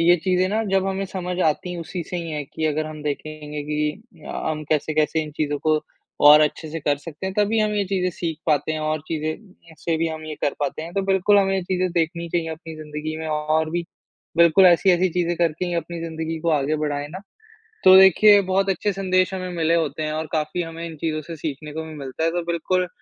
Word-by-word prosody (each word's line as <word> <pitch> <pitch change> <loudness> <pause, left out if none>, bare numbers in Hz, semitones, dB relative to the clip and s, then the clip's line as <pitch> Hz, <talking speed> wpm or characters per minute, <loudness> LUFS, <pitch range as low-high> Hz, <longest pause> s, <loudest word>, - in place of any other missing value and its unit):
ये 175 +1 +6
चीज़ें 185 -1 +2
ना, 220 +3 0
जब 195 -2 +1
हमें 195 0 -1
समझ 180 -1 -4
आती 160 +3 0
हैं 175 - -5
उसी 170 +2 -5
से 180 - -2
ही 170 -1 -4
हैं 150 -1 -3
कि 160 - -2
अगर 155 0 -1
हम 155 -1 -8
देखेंगे 150 0 -5
कि 150 +4 -4
अ, - - -3
हम 155 -1 -3
कैसे-कैसे 155 +1 +1
इन 155 - -7
चीज़ों 145 -1 -1
को 155 -1 +3 0.4
और 150 +1 +9
अच्छे-से 155 +1 -1
कर 145 0 +1
सकते 150 +5 -8
हैं। 190 - -4
तभी 210 +2 +2
हम 215 -1 +2
ये 205 -1 +1
चीज़ें 185 -1 0
सीख 165 -3 -3
पाते 155 0 +1
हैं 155 - -3
और 155 0 -1
चीज़ें 155 -1 -1
उनसे 170 -5 -6
भी 165 +1 +1
हम 155 0 -6
ये 155 -1 -5
कर 145 - +1
पाते 145 +1 -2
हैं। 165 +2 -8
तो 195 - +1
बिल्कुल, 195 +1 +3
हमें 195 -1 +2
ये 190 - 0
चीज़ें 185 0 -1
देखनी 170 0 -1
चाहिए 165 -1 -1
अपनी 160 0 -9
ज़िंदगी 155 0 -5
में 160 - -5
और 155 +1 0
भी 170 +1 -2 0.5
बिल्कुल 170 +3 +6
ऐसी-ऐसी 180 +1 +4
चीज़ें 175 -1 0
करके 170 0 0
ही 175 - -2
अपनी 170 0 -3
ज़िंदगी 160 0 -4
को 170 +1 0
आगे 150 0 +1
बढ़ाएँ 145 -1 -2
ना, 180 +5 -7 0.7
तो 185 0 +9
देखिए 200 +2 +7
बहुत 195 +1 0
अच्छे 200 +2 0
संदेश 185 0 +1
हमें 185 -1 -4
मिले 165 0 +2
होते 155 -2 -1
हैं 155 - -2
और 155 +1 -2
काफ़ी 155 +2 -1
हमें 165 0 -6
इन 165 -1 -7
चीज़ों 155 0 -2
से 165 +2 -8
सीखने 150 -1 -5
को 160 +1 -4
भी 160 0 -9
मिलता 140 +1 -5
है। 165 - +3
तो 175 +1 -1
बिल्कुल, 180 +2 0
165 Hz, 230 wpm, -23 LUFS, 155-185 Hz, 0.7 s, और